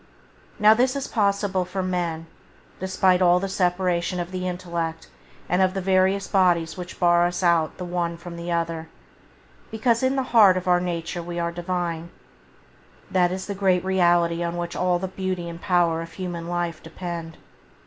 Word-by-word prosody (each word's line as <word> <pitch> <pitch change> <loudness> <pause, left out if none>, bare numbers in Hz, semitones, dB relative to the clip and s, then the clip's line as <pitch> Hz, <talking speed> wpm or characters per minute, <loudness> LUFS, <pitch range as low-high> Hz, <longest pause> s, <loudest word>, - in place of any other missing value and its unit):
Now 210 +1 +7
this 255 +4 +1
is 275 - -3
possible 200 -3 +1
for 185 +1 -4
men, 175 -3 -2 0.5
despite 185 0 +2
all 180 0 +5
the 195 - -2
separation 180 -1 0
of 175 +1 -4
the 185 0 -3
intellect 170 -2 -4 0.4
and 180 +2 +1
of 185 0 +2
the - - 0
various 190 +1 +2
bodies 175 -4 +2
which 180 -1 -8
bar 175 -1 +4
us 180 +1 -4
out 170 -2 +2
the 180 - -5
one 175 -1 -2
from 170 0 -9
the 170 +1 -5
other, 165 -1 -2 0.8
because 225 +1 +1
in 260 +1 +1
the 265 - +1
heart 200 -5 +7
of 185 0 -4
our 180 0 +4
nature 175 -1 -3
we 175 0 -6
are 170 0 -1
Divine. 170 -1 -3 1.0
That 180 -1 +3
is 185 0 -4
the 200 - -4
great 190 -2 +1
reality 175 -2 +2
on 170 0 -2
which 175 0 -4
all 180 -1 +1
the 190 +2 -3
beauty 185 -2 -4
and 170 0 -8
power 175 -3 +2
of 165 0 -9
human 175 -3 -5
life 175 -2 -3
depend. 170 -2 -7
180 Hz, 180 wpm, -24 LUFS, 170-190 Hz, 1.0 s, Now